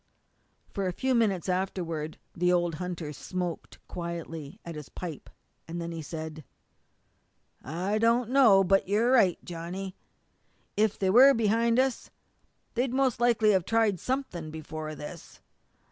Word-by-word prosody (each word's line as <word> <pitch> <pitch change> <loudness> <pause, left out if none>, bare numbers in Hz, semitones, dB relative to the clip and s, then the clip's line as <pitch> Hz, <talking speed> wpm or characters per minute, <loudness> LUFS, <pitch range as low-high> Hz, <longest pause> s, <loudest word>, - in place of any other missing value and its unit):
For 195 -2 -1
a - - 0
few 260 +7 0
moments 205 -8 +1
afterward 175 -4 -2 0.2
the 180 +1 +2
old 175 -1 +2
hunter 170 -4 -4
smoked 175 +3 -5
quietly 165 -4 -6
at 170 - -6
his 150 -3 -8
pipe. 170 -5 -7 0.4
Then 170 0 -4
he 165 -1 -5
said: 155 0 -6 1.2
"I 180 - -1
don't 230 +1 +2
know 230 -8 +6
but 195 +1 +3
you're 220 +5 +2
right, 200 -9 +5
Johnny. 180 +3 -6 0.8
If 215 0 +2
they 190 -1 +1
were 265 +6 +8
behind 230 +1 +2
us 260 -2 0 0.6
they'd 250 +1 0
most 265 -4 +2
likely 230 -3 +4
have 190 -3 +3
tried 220 -2 +2
something 250 - -3
before 155 0 -6
this. 155 +3 -10
185 Hz, 135 wpm, -28 LUFS, 165-225 Hz, 1.2 s, were